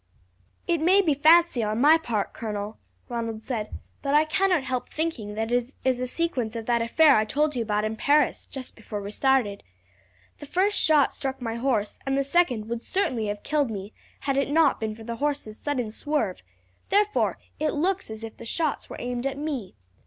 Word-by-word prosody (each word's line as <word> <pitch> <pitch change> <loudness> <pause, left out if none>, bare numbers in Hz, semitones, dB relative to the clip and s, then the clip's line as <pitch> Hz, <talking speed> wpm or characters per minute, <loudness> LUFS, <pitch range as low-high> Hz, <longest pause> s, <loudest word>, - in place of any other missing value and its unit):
"It 335 -2 +1
may 370 +5 +5
be 315 -5 +3
fancy 320 -1 +5
on 215 +1 -1
my 300 +5 +7
part, 235 -11 -2
colonel," 210 -1 -5 0.3
Ronald 230 -2 -4
said, 220 -4 -3 0.3
"but 280 0 +1
I 305 +1 +5
cannot 360 -1 +2
help 255 -1 -3
thinking 275 -11 -3
that 225 +1 -2
it 245 +2 0
is 255 -1 +2
a 255 - -2
sequence 250 -7 -2
of 225 -1 -4
that 235 0 +2
affair 290 +6 +5
I 215 - +4
told 295 +7 0
you 240 - 0
about 210 -1 0
in 215 +1 -2
Paris, 290 +5 +2
just 265 -3 -8
before 215 -2 -6
we 200 0 -6
started. 250 -5 +1 0.8
The 290 - -9
first 390 +6 +1
shot 300 -3 +4
struck 270 -1 -4
my 230 -3 -3
horse 230 -4 -1
and 270 0 0
the 275 - +2
second 270 -8 +1
would 230 0 -3
certainly 250 - -1
have 205 0 -4
killed 290 -3 +1
me 205 -1 -6 0.3
had 275 -1 0
it 275 - +1
not 305 -1 +3
been 220 -1 -3
for 225 - -11
the 230 +1 -5
horse's 280 -6 -2
sudden 255 -7 -2
swerve, 230 -6 -2 0.5
therefore 420 +1 +2 0.2
it 305 0 0
looks 365 +3 0
as 220 0 -7
if 225 - -8
the - - -10
shots 315 +4 -1
were - - -7
aimed 245 +1 -2
at 275 0 -4
me. 280 - -4
255 Hz, 200 wpm, -26 LUFS, 220-300 Hz, 0.8 s, my